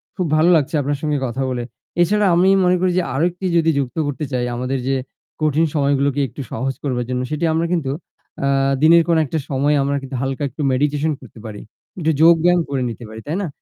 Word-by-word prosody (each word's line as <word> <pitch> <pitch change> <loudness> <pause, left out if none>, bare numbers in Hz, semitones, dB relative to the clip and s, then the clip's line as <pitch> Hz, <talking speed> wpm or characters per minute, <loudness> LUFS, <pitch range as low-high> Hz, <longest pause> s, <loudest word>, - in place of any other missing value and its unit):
খুব 180 -3 -1
ভালো 160 +3 +4
লাগছে 155 +1 +1
আপনার 145 +1 -1
সঙ্গে 150 -2 0
কথা 125 +2 -3
বলে। 120 -1 -2 0.4
এছাড়া 210 +4 +3
আমি 185 +2 +4
মনে 180 0 +4
করি 185 - +2
যে 180 - 0
আরেকটি 175 +6 -1
যদি 165 -1 +3
যুক্ত 130 +1 -4
করতে 145 +1 -3
চাই 125 -1 -1
আমাদের 125 +2 -2
যে 135 - +1 0.5
কঠিন 155 +1 +2
সময়গুলোকে 140 0 +1
একটু 140 - -9
সহজ 135 +4 -2
করবার 125 -4 -1
জন্য 125 0 -1
সেটি 155 +2 -1
আমরা 165 +1 +1
কিন্তু 150 -6 -1 0.6
আ - - +2 0.4
দিনের 170 +2 +7
কোনো 165 -1 +3
একটা 155 +4 -2
সময়ে 145 +1 +1
আমরা 140 +1 0
কিন্তু 135 0 -7
হালকা 135 +2 -2
একটু 150 - -8
মেডিটেশন 145 +3 +1
করতে 120 -2 -14
পারি। 105 -2 -7 0.4
একটু 160 -1 +1
যোগব্যায়াম 170 +1 +5
করে 135 -2 -1
নিতে 115 +1 -8
পারি। 110 - -9
তাই 155 - -2
না? 190 - -2
145 Hz, 205 wpm, -20 LUFS, 135-165 Hz, 0.6 s, দিনের